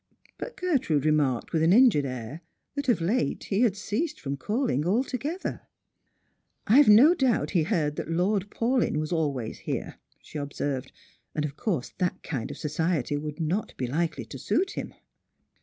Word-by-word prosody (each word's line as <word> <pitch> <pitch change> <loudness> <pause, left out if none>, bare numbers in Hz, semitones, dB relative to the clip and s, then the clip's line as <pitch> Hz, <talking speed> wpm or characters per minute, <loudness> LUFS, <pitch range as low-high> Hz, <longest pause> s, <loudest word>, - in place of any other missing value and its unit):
But - - -6
Gertrude 260 - +1
remarked 150 -5 +1
with 160 - +2
an 165 +2 +4
injured 225 - +5
air 130 +4 -6 0.3
that 285 -2 -2
of 230 - +3
late 220 +9 0
he 200 +2 0
had 215 -5 +3
ceased 285 +10 -2
from 140 -1 -3
calling 205 - 0
altogether. 260 - -2 0.5
" - - -47
I've 265 +7 +6
no 250 +11 +8
doubt 265 -9 +1
he 175 - +3
heard 150 -2 0
that - - -4
Lord 190 +4 +1
Paulyn 240 -7 +1
was 155 +1 -2
always 140 -9 -1
here," - - -4 0.2
she 155 - -8
observed; 140 -2 -3 0.2
" - - -40
and 150 - 0
of 145 -1 -5
course 175 - -2
that 180 -2 -1
kind 135 -8 -4
of - - -7
society 155 -2 -1
would 150 +2 -5
not 170 +7 -2
be 130 - -1
likely 160 +7 -2
to - - -9
suit 385 +1 0
him." - - -6
170 Hz, 175 wpm, -27 LUFS, 150-235 Hz, 0.5 s, no